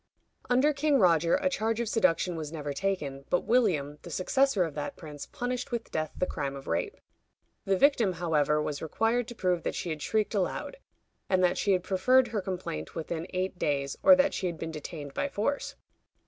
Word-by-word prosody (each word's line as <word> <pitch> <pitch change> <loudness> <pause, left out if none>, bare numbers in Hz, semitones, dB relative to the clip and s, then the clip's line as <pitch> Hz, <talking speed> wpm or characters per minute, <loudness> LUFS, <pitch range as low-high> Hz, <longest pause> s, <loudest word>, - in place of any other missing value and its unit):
Under 260 +5 +4
King 290 0 +2
Roger 170 - +4
a 285 0 +1
charge 225 -4 0
of 235 - -1
seduction 185 -5 +2
was 155 -2 -5
never 150 -3 -4
taken, 145 -6 -2
but 180 - +2
William, 160 - +1
the - - -10
successor 265 +1 +2
of 160 -3 -4
that 145 0 -4
prince, 150 -3 -9
punished 250 +2 -4
with 235 -1 -4
death 155 -1 -2
the - - +1
crime 140 -5 -3
of 135 - -9
rape. 85 - -2 0.7
The 195 -1 +2
victim, 240 -6 +4
however, 150 -3 +1
was 150 -1 -3
required 225 +8 0
to 240 - -8
prove 180 -5 0
that - - -3
she 175 - -3
had 155 -1 -4
shrieked 215 +5 0
aloud, 205 - -2 0.5
and 185 -1 +3
that 180 - +2
she 200 - +2
had 180 -1 +1
preferred 245 +7 +3
her 215 -2 -2
complaint 180 - -5
within 165 +1 -4
eight 185 0 -3
days, 140 -2 0
or 285 -1 +8
that 280 +1 +2
she 185 - -1
had 170 -2 -4
been 165 +1 -5
detained 150 -2 -7
by 285 - -1
force. 280 +3 -2
185 Hz, 200 wpm, -29 LUFS, 155-235 Hz, 0.7 s, or